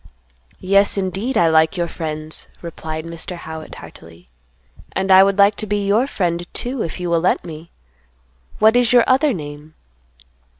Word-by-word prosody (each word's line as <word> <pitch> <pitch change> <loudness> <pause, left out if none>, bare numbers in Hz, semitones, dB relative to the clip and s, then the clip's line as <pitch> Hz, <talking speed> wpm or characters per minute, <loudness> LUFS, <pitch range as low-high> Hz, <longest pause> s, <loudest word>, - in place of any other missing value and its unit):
"Yes, 200 +2 +2
indeed, 195 +7 -2
I 170 - +4
like 160 +2 +3
your 170 -1 -1
friends," 155 -2 -4 0.2
replied 160 -1 -6
Mr. 170 +2 -7
Howitt, 160 -2 -9
heartily; 85 +1 -14 0.7
"and 190 0 -1
I 190 0 +8
would 195 0 +1
like 200 +1 +5
to 215 - -5
be 205 0 -1
your 215 +6 +2
friend 175 -7 -3
too, 245 0 -3
if 165 - -4
you 180 - -3
will 170 -1 +1
let 180 - 0
me. 160 0 -10 0.9
What 220 +2 +4
is 245 -2 +3
your 245 -1 +6
other 270 +3 +3
name?" 150 - -8
180 Hz, 165 wpm, -19 LUFS, 160-205 Hz, 0.9 s, I